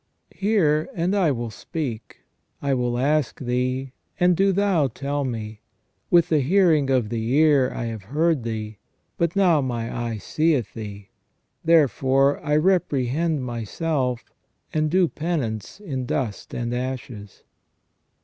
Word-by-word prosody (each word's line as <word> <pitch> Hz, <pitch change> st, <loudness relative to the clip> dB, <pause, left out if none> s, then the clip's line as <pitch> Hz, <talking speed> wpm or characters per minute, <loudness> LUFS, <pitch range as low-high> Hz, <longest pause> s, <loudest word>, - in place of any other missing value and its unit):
Hear, 175 Hz, -8 st, +1 dB
and 180 Hz, +4 st, 0 dB
I 185 Hz, -5 st, +3 dB
will 120 Hz, -4 st, -2 dB
speak; 120 Hz, -2 st, -6 dB, 0.4 s
I 140 Hz, -1 st, 0 dB
will 125 Hz, -1 st, 0 dB
ask 145 Hz, +1 st, +1 dB
Thee, 125 Hz, +1 st, -1 dB, 0.3 s
and 180 Hz, 0 st, +4 dB
do 195 Hz, +3 st, +3 dB
Thou 190 Hz, -6 st, +2 dB
tell 140 Hz, +3 st, -3 dB
me. 110 Hz, -4 st, -5 dB, 0.5 s
With 170 Hz, -2 st, +4 dB
the 155 Hz, -, +3 dB
hearing 155 Hz, -2 st, +3 dB
of 125 Hz, -5 st, +2 dB
the 115 Hz, -1 st, -2 dB
ear 145 Hz, -4 st, +4 dB
I 120 Hz, -, -4 dB
have 110 Hz, -4 st, -6 dB
heard 155 Hz, 0 st, +2 dB
Thee, 110 Hz, -2 st, -5 dB, 0.4 s
but 170 Hz, +1 st, +1 dB
now 180 Hz, -6 st, +4 dB
my 120 Hz, -3 st, -3 dB
eye 120 Hz, -2 st, -3 dB
seeth 140 Hz, -, 0 dB
Thee. 105 Hz, -3 st, -8 dB, 0.5 s
Therefore 140 Hz, -4 st, +3 dB
I 150 Hz, 0 st, +1 dB
reprehend 155 Hz, -3 st, +1 dB
myself, 125 Hz, +2 st, -2 dB, 0.4 s
and 155 Hz, 0 st, +1 dB
do 180 Hz, +2 st, +3 dB
penance 150 Hz, -, -3 dB
in 135 Hz, -11 st, -4 dB
dust 120 Hz, -8 st, -3 dB
and 120 Hz, 0 st, -2 dB
ashes." 125 Hz, -5 st, -6 dB
135 Hz, 135 wpm, -23 LUFS, 120-160 Hz, 0.5 s, and